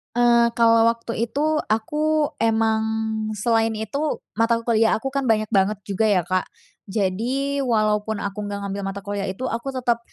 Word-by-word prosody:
Eee, 240 -1 +5
kalau 230 -1 +5
waktu 230 0 -1
itu 305 +5 0
aku 300 +7 0
emang 220 -1 +2 0.5
selain 225 +1 +1
itu 275 +8 -3 0.2
mata 230 +1 +3
kuliah 225 -1 +3
aku 270 +5 -4
kan 275 -1 -1
banyak 215 -2 +2
banget 200 0 +2
juga 200 +3 -1
ya, 200 -4 +3
Kak. 185 +2 -1 0.4
Jadi 230 +9 -1
walaupun 215 -4 0
aku 200 0 -4
nggak 200 0 -4
ngambil 200 0 -4
mata 195 0 -6
kuliah 200 0 -3
itu 190 +7 -5
aku 235 +4 -4
tetep 240 -2 +1
225 Hz, 160 wpm, -22 LUFS, 210-240 Hz, 0.5 s, Eee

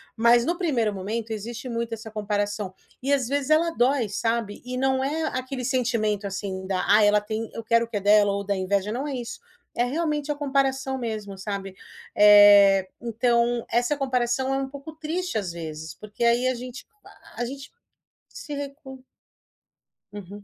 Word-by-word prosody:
mas 235 +1 +4
no 345 +1 0
primeiro 245 - 0
momento, 220 +4 -4
existe 225 +4 -5
muito 230 0 -3
essa 220 0 -7
comparação. 205 -2 -2 0.3
E, 275 +2 -1
às 260 -4 +1
vezes, 280 +1 -1
ela 330 +2 +3
dói, 250 -5 +1
sabe. 225 -1 -2
E 250 0 -4
não 265 0 +1
é 310 +4 -1
aquele 255 -1 -4
sentimento, 230 -5 0
assim, 190 -1 -5
da 190 -2 -1
"Ai, 210 +1 +6
ela 210 0 +4
tem, 220 +1 -4
eu 230 - -6
quero 230 +1 +3
o - - -19
que 210 - -2
é - - 0
dela" 205 0 +5
ou 200 0 -2
da 200 0 -1
inveja 195 +2 -1
não 265 +5 -3
é 280 - -3
isso. 245 - -6 0.4
É 240 - +2
realmente 300 +1 -1
a - - -2
comparação 270 -2 0
mesmo, 215 -4 -5
sabe. 195 -1 -5 0.4
Eh, 205 -2 +7
então, 235 0 +1
essa 245 +5 +1
comparação 260 0 0
é - - +1
um 270 0 -3
pouco 280 +3 -9
triste, 335 +2 -3
às 190 -5 -2
vezes, 160 -2 -7
porque 215 +2 -6
aí 240 +2 +3
a 255 - +2
gente 250 +1 -8 0.2
a - - -12
a - - 0
gente 275 +3 -8 0.6
se 295 - -8
recu 275 -2 -8 1.1
Uhum. 205 0 -9
235 Hz, 180 wpm, -25 LUFS, 205-265 Hz, 1.1 s, Eh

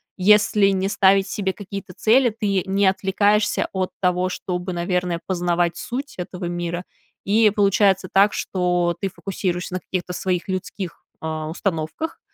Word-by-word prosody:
если 210 +1 +4
не 195 0 0
ставить 195 -1 +4
себе 195 -1 -1
какие-то 195 -1 -8
цели, 240 +6 +4
ты 205 -4 -1
не 195 +1 +2
отвлекаешься 205 +2 +2
от 185 -1 -1
того, 180 0 +1
чтобы, 180 0 -4
наверное, 175 0 -1
познавать 175 -2 0
суть 275 +9 -5
этого 180 0 -5
мира, 175 0 -3 0.4
и 215 +2 +5
получается 195 -2 +3
так, 200 +2 +5
что 180 -2 0
ты 195 - 0
фокусируешься 185 -2 -3
на 185 - -1
каких-то 180 -1 -4
своих 180 -1 -2
людских, 185 -1 -5 0.2
э, - - -2
установках, 160 - -3
190 Hz, 140 wpm, -22 LUFS, 180-200 Hz, 0.4 s, и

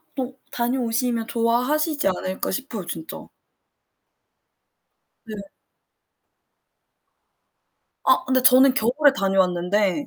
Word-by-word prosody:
또 260 0 -5
다녀오시면 240 -1 -1
좋아하시지 250 +6 0
않을까 185 0 -3
싶어요 240 -9 -5
진짜. 160 -1 -8 2.0
네. 215 - -7 2.7
아. - - +3
근데 260 -1 +1
저는 260 +1 +6
겨울에 265 +6 +2
다녀왔는데 190 +4 0
240 Hz, 195 characters per minute, -22 LUFS, 195-265 Hz, 2.7 s, 저는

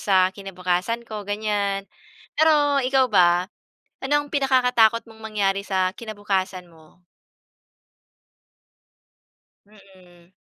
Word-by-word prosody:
sa 185 -2 +3
kinabukasan 190 +3 -3
ko, 215 -2 -6
ganyan. 205 -1 -1 0.6
Pero 295 -2 +4
ikaw 260 0 +3
ba, 180 -1 +3 0.5
ano 270 +2 0
ang 290 - -13
pinakakatakot 250 -5 +3
mong 220 - -16
mangyari 200 -2 -1
sa 185 -1 0
kinabukasan 195 -5 -3
mo? 160 +2 -22 2.6
Mm. 185 -4 -21
205 Hz, 90 wpm, -23 LUFS, 185-230 Hz, 2.6 s, Pero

